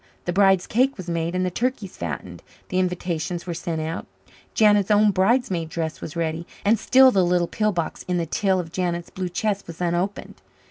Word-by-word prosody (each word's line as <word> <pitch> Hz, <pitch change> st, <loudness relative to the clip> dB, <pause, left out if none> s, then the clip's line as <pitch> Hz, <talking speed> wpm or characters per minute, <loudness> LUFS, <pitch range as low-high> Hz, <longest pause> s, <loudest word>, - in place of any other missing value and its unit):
The 175 Hz, -, -1 dB
bride's 195 Hz, -1 st, +4 dB
cake 260 Hz, +4 st, +1 dB
was 185 Hz, -2 st, -8 dB
made 170 Hz, +1 st, -2 dB
and 185 Hz, 0 st, +1 dB
the 180 Hz, -, -1 dB
turkeys 230 Hz, -3 st, -2 dB
fattened. -, -, -6 dB, 0.3 s
The 185 Hz, -, 0 dB
invitations 180 Hz, -1 st, -2 dB
were 175 Hz, -, -3 dB
sent 165 Hz, -1 st, -3 dB
out. 160 Hz, +3 st, -4 dB, 0.5 s
Janet's 205 Hz, -2 st, +4 dB
own 210 Hz, 0 st, +5 dB
bridesmaid 190 Hz, -4 st, +1 dB
dress 160 Hz, 0 st, -4 dB
was 155 Hz, -, -7 dB
ready. 165 Hz, 0 st, -2 dB, 0.2 s
And 215 Hz, +1 st, +4 dB
still 260 Hz, 0 st, +6 dB
the 190 Hz, -5 st, +3 dB
little 175 Hz, 0 st, +2 dB
pill 215 Hz, +4 st, 0 dB
box 170 Hz, -4 st, -3 dB
in 180 Hz, -1 st, 0 dB
the 170 Hz, -, 0 dB
till 190 Hz, +3 st, +1 dB
of 165 Hz, -3 st, -5 dB
Janet's 175 Hz, -1 st, -2 dB
blue 185 Hz, -1 st, -4 dB
chest 200 Hz, +2 st, -2 dB
was 165 Hz, -1 st, -9 dB
unopened. 175 Hz, +3 st, -2 dB
180 Hz, 195 wpm, -23 LUFS, 170-205 Hz, 0.5 s, still